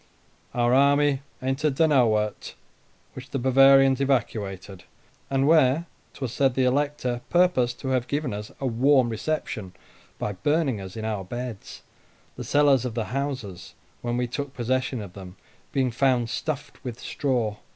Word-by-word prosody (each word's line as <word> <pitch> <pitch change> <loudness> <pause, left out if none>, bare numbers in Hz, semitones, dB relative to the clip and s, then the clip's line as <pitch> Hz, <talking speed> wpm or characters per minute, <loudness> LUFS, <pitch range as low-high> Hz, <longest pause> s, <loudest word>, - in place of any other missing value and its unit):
Our 120 0 +2
army 140 +1 +4 0.2
entered 135 +2 0
Donauwort, 120 -9 +2 0.6
which 130 +1 -10
the 140 - -2
Bavarians 135 +1 +5
evacuated; 100 -8 -2 0.5
and 135 0 +1
where 155 0 +4 0.3
'twas 130 -4 -4
said 135 0 +2
the 130 - +2
Elector 130 -2 0
purposed 145 -9 +2
to 130 - -3
have 130 -2 0
given 145 -4 -2
us 105 +1 -6
a 135 - -3
warm 130 +1 +3
reception, 115 -5 -3 0.4
by 105 - -3
burning 145 - 0
us 95 +2 -9
in 110 - -4
our 105 -3 -2
beds; 120 +1 -7 0.5
the - - -6
cellars 145 -4 +3
of 125 -3 -4
the 115 -2 -1
houses, 130 -10 -4 0.3
when 120 0 -2
we 125 - 0
took 140 +3 -5
possession 130 0 -1
of 100 -3 -9
them, 95 -1 -10 0.4
being 130 -3 +1
found 125 -1 +1
stuffed 150 -1 -5
with 120 -3 -6
straw. 120 -7 -1
130 Hz, 150 wpm, -25 LUFS, 115-140 Hz, 0.6 s, Bavarians